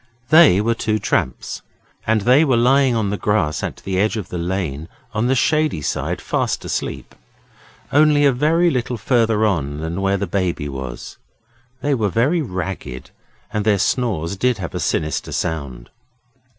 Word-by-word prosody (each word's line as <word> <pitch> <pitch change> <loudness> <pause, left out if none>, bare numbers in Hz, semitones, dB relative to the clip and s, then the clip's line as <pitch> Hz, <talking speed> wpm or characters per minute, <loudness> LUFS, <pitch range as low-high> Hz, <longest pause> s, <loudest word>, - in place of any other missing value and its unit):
They 155 - +7
were 115 +2 +1
two 110 -1 -1
tramps, 65 - -2 0.5
and 110 -1 +2
they 125 +8 +5
were 130 -6 +2
lying 130 +1 +3
on 105 -3 0
the 105 - -2
grass 85 -8 0
at - - -5
the 95 -1 -1
edge 110 +3 +1
of 100 -5 -5
the 90 - -4
lane 85 -4 -3 0.2
on 110 +3 0
the 130 - +2
shady 155 - +1
side - - -2
fast - - -1
asleep, - - -4 0.8
only 145 0 +5
a 140 - +6
very 160 +7 +2
little 125 -2 -2
further 115 -1 +2
on 75 -8 -1
than 80 +4 -4
where 100 0 +1
the 100 - -2
Baby 90 -5 -2
was. 65 -3 -7 0.6
They 145 - +1
were 110 -6 +1
very 135 - +1
ragged, 90 - -5 0.4
and 105 -1 0
their 105 -1 +3
snores 100 -6 -1
did 125 +4 +1
have 90 -4 -6
a - - -3
sinister 80 -1 -1
sound. 70 -7 -4
105 Hz, 165 wpm, -20 LUFS, 85-125 Hz, 0.8 s, They